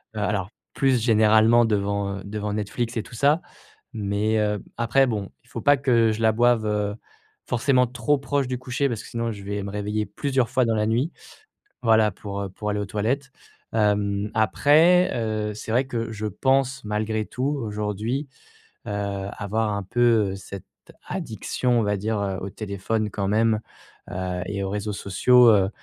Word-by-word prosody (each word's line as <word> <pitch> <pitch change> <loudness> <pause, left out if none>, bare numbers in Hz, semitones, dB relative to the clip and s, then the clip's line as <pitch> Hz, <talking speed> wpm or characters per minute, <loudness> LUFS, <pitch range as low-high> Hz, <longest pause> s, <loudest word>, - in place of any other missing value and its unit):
Heu, - - -3
alors 100 -2 -1 0.3
plus 130 -3 +2
généralement 110 +1 +5
devant, 100 -2 -1
heu, - - -10
devant 105 0 -4
Netflix 115 +3 -3
et 110 - -1
tout - - -12
ça. 145 +7 +3 0.5
Mais, 105 0 -1
hem, 105 -1 0 0.2
après 120 +3 +3
bon, 105 -5 -3
il 120 - -29
faut 115 - -6
pas 145 - +5
que 120 -4 +3
je 110 - -4
la 110 -1 +4
boive, 120 -1 +3
heu, 105 -1 0 0.6
forcément 125 +1 +3
trop 125 +4 0
proche 140 -1 -1
du 125 -1 -3
coucher 130 +2 -1
parce 115 -4 -3
que - - -11
sinon 115 0 -2
je 100 -2 -8
vais 100 0 -3
me 100 - -5
réveiller 105 +1 -2
plusieurs 130 -2 -1
fois 130 - +3
dans 115 -1 +1
la 105 0 +1
nuit 125 +9 +1 0.7
voilà 110 -2 +4
pour, 100 +1 -6
heu, 100 - -4
pour 105 +3 -5
aller 105 - -1
aux 105 - -2
toilettes. 120 +8 -2 0.4
Hem, 105 -1 +1
après, 155 - +4
heu, 110 -2 -2
c'est 110 - -6
vrai 125 +4 +2
que 115 -3 -3
je 110 0 -5
pense 135 +5 +1
malgré 110 +1 -1
tout 130 +4 -4 0.2
aujourd'hui, 105 +6 -3 0.6
heu, - - -3
avoir 100 +2 -2
un 100 - -3
peu, 115 -1 +2
heu, - - -5
cette 95 -1 -9 0.4
addiction 125 -2 -1
on - - 0
va 105 -1 0
dire, 110 +2 -2
heu, 95 -2 -2
au 100 - -4
téléphone 105 +2 -3
quand 100 -2 -2
même, 110 +1 +2 0.5
heu 90 0 -3
et 100 -1 -3
aux 95 - -2
réseaux 105 +1 -3
sociaux, 120 +6 +5
heu, 100 -3 +4
110 Hz, 185 wpm, -24 LUFS, 105-120 Hz, 0.7 s, généralement